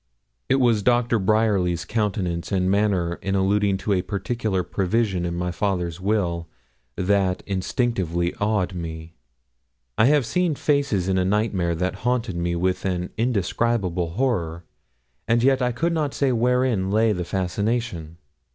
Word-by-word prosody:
It 135 - +4
was 120 -5 +3
Doctor 120 0 +2
Bryerly's 95 -4 +1
countenance 100 -5 -2
and 95 -1 +1
manner 95 -4 +1
in 95 0 -1
alluding 100 +1 +2
to 100 +2 -1
a 90 - +2
particular 100 +1 -2
provision 95 -2 0
in 85 - -3
my 90 +1 -2
father's 90 -2 -2
will 90 -5 0 0.5
that 95 -1 +1
instinctively 95 - -1
awed 105 -3 +1
me. 80 -1 -6 0.9
I - - +6
have 145 -1 +4
seen 180 +3 0
faces 140 - +1
in 95 -1 +2
a - - +2
nightmare 95 -3 0
that 90 +3 -2
haunted 120 -5 0
me 85 0 -1
with 90 +2 0
an 90 -2 -2
indescribable 100 -5 0
horror, 90 -9 -1 0.6
and 115 +1 +2
yet 135 0 +3
I 125 0 +1
could 165 +8 -1
not 150 -4 -1
say 140 -2 +2
wherein 120 -4 +1
lay 110 +2 +3
the 90 -4 -2
fascination. 95 -2 -2
100 Hz, 145 wpm, -23 LUFS, 90-115 Hz, 0.9 s, I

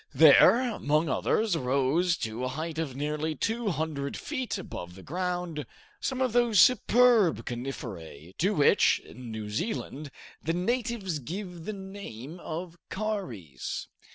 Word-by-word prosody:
There, 235 - +8
among 155 -2 +1
others, 210 - +1
rose, 140 +6 +2
to 110 +3 -5
a - - 0
height 155 +4 -4
of 145 -6 -3
nearly 150 +2 -2
200 160 -12 -2
feet 260 -7 -3
above 90 - -7
the 95 - -12
ground, 180 -2 -3 0.4
some 260 -1 -2
of 255 -3 +1
those 240 -4 +4
superb 240 -4 +5
coniferae, 100 - -6
to 195 +5 +2
which, 145 - +5
in 125 0 -11
New 110 -1 -5
Zealand, 145 - -3 0.3
the 165 - -1
natives 210 -2 -1
give 175 - -6
the 215 - -3
name 190 - -8
of 170 +1 -6
Kauris. 165 - -4
165 Hz, 130 wpm, -28 LUFS, 135-205 Hz, 0.4 s, There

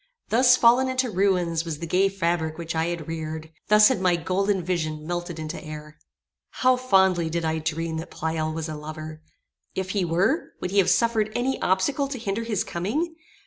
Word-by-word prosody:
Thus 250 +2 +5
fallen 250 +2 +5
into 255 -2 0
ruins 180 -4 +1
was 165 -3 -4
the 170 - -5
gay 185 +4 +2
fabric 170 -4 -1
which 165 -1 -4
I 160 0 0
had 170 -3 -4
reared! 160 -1 -5 0.2
Thus 210 0 +7
had 255 -8 0
my 180 -2 +3
golden 185 +3 0
vision 155 -3 -2
melted 175 0 -4
into 155 +2 -6
air! 150 -1 -9 0.5
How 255 0 +3
fondly 190 -9 +3
did 170 0 -2
I 160 0 0
dream 160 +1 -2
that 160 +2 -6
Pleyel 160 0 -2
was 160 0 -4
a 155 - -5
lover! 155 +1 -8 0.5
If 190 0 -2
he 200 -2 0
were, 180 - 0
would 180 - -4
he 200 - +3
have 190 - +4
suffered 225 -2 +2
any 260 +2 -1
obstacle 255 +10 +1
to 270 -1 -5
hinder 220 -1 -3
his 220 -4 -1
coming? 290 - -2
175 Hz, 190 wpm, -25 LUFS, 160-210 Hz, 0.5 s, Thus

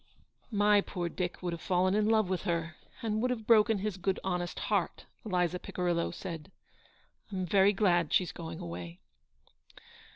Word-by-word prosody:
" - - -37 0.2
My 205 -1 +6
poor 175 -3 -4
Dick 180 +1 -4
would 175 -1 -1
have 170 - -6
fallen 185 0 +2
in 210 +1 +2
love 220 -3 +3
with 185 -1 -1
her, 170 -1 -2 0.3
and 215 -1 0
would 250 - +1
have 230 -3 -3
broken 220 -1 +5
his 200 -1 -3
good, 190 +1 -1
honest 180 -2 -2
heart," - - -1 0.2
Eliza 180 -4 0
Picirillo 175 -2 -1
said. 165 -2 -7 0.4
" - - -36
Pm 185 -2 -2
very 195 +2 +5
glad 175 -6 +2
she's 180 - +2
going 165 -1 -7
away." 85 0 -7
185 Hz, 170 wpm, -31 LUFS, 170-205 Hz, 0.4 s, My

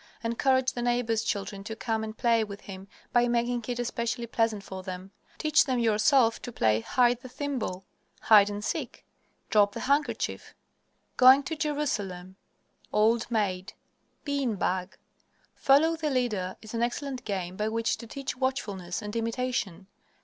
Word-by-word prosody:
Encourage 260 +3 +2
the 240 - -4
neighbors' 240 -2 +1
children 200 -2 -3
to 220 +2 -6
come 220 -1 -2
and 215 0 -6
play 230 -2 +3
with 205 -1 -8
him 190 -1 -9 0.3
by 240 0 +4
making 240 0 0
it 245 -1 -2
especially 235 0 -2
pleasant 225 -3 0
for 190 -1 -7
them. 185 +1 -7 0.3
Teach 305 -1 +3
them 260 -2 0
yourself 230 +2 +3
to 245 - -6
play 110 - +2
"Hide 245 - +2
the 255 - -10
Thimble," 250 -9 -4 0.4
"Hide 205 -2 +6
and 205 +1 -5
Seek," - - -4 0.5
"Drop 205 -1 +4
the - - -5
Handkerchief," 285 +2 -1 0.6
"Going 260 +2 +8
to 320 +4 -4
Jerusalem," 210 - -3 0.6
"Old 225 +3 +2
Maid," 195 -5 -1 0.5
"Bean 280 -6 -1
Bag." 185 0 -2 0.6
Follow 305 +5 +4
the 315 -2 -2
Leader 215 -9 -1
is 215 - -10
an 230 - -1
excellent 255 +2 -2
game 185 -4 -3
by 210 +2 -1
which 230 +2 0
to 235 - -9
teach 275 +4 -5
watchfulness 210 -8 -3
and 210 +1 -6
imitation. 230 -5 -2
230 Hz, 155 wpm, -28 LUFS, 205-255 Hz, 0.6 s, Going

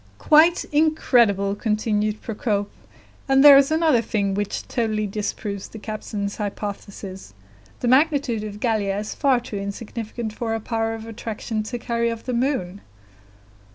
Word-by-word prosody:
"Quite 320 - +5
incredible!" 240 -10 +3
continued 215 0 -1
Procope. 210 -3 -2 0.6
"And 270 0 +5
there 285 -1 +11
is 275 0 +5
another 315 -6 +3
thing 205 -3 -1
which 205 0 -3
totally 215 -3 -1
disproves 205 -1 -4
the - - -11
captain's 210 -1 -5
hypothesis; 200 - -6 0.5
the 245 - 0
magnitude 270 -4 +2
of 210 -1 -7
Gallia 210 -4 0
is 210 +1 -4
far 270 -4 +2
too 225 -3 -7
insignificant 215 +2 -5
for 225 0 -3
her 225 - -1
power 225 0 -2
of 225 0 -8
attraction 225 0 -4
to 215 +3 -5
carry 235 0 -1
off 230 -1 -6
the 255 - -3
moon." 235 -7 -1
220 Hz, 145 wpm, -23 LUFS, 205-245 Hz, 0.6 s, there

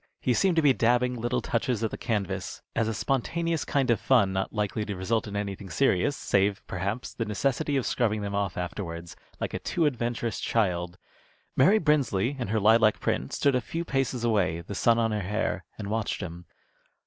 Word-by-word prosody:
He 125 - +1
seemed 185 +8 +2
to 160 - +3
be 140 -2 +6
dabbing 125 +1 +2
little 120 +1 -1
touches 115 -1 -1
at 110 - 0
the - - -4
canvas, 105 -6 -3
as 115 -1 +1
a 115 - -1
spontaneous 165 +7 -1
kind 135 -4 +1
of 115 - +2
fun 105 -8 +3
not 95 0 -1
likely 105 0 -1
to 105 -1 -4
result 110 +4 -1
in 100 - -6
anything 100 -1 -4
serious, 135 - +2
save, 100 +1 +1
perhaps, 100 +7 -3
the 115 - -2
necessity 135 +7 0
of 130 - -1
scrubbing 110 -4 0
them 100 0 -4
off 100 -3 -1
afterwards, 85 -2 -5 0.2
like - - -3
a - - -2
too 170 - 0
adventurous 120 -4 -1
child. 90 -5 0 0.6
Mary 185 +12 +5
Brinsley, 145 - +1
in 120 - -2
her 110 +2 +1
lilac 110 +1 +5
print, 65 - -1
stood 140 - +2
a 125 - +2
few 165 +7 -4
paces 135 -4 -1
away, 100 -8 +1
the 90 - -7
sun 115 +3 +3
on 115 -1 +1
her 105 -1 -1
hair, 105 +4 -2
and 105 - -5
watched 110 -1 -1
him. 85 -2 -7
110 Hz, 195 wpm, -27 LUFS, 100-125 Hz, 0.6 s, be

